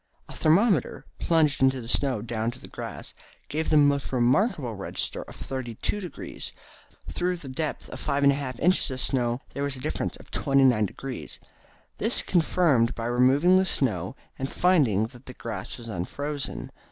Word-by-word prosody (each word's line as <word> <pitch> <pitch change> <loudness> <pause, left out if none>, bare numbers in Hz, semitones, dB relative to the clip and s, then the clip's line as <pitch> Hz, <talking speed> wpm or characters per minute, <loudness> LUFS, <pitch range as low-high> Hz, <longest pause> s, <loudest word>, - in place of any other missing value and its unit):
A - - -10
thermometer, 160 - +2
plunged 155 -5 +2
into 130 0 +4
the 115 - -8
snow 125 -3 +1
down 115 -1 -1
to 120 - -8
the - - -11
grass, - - -7 0.4
gave 160 +2 -1
the 155 - +5
most 145 -1 +3
remarkable 130 - +2
register 100 -2 -3
of - - -11
32°. 135 - -5 0.6
Through 180 0 0
the 155 - -10
depth 150 +4 -3
of - - -7
5 140 -1 0
1/2 140 -3 +2
inches 180 -1 +3
of 130 -1 -4
snow 120 -1 0
there 140 - -4
was 140 -1 0
a - - -6
difference - - -2
of - - -16
temperature 135 -1 +4
of 105 -1 +1
29°. 135 -2 -6 0.6
This - - 0
was - - -1
confirmed 160 -9 +3
by 115 - -4
removing 135 +10 +5
the - - +4
snow, 110 - -1 0.2
and 135 0 -3
finding 145 - +3
that 120 +3 -8
the 125 - -7
grass 110 -5 -5
was 120 -1 -10
unfrozen. 140 +9 -4
135 Hz, 170 wpm, -27 LUFS, 120-150 Hz, 0.6 s, the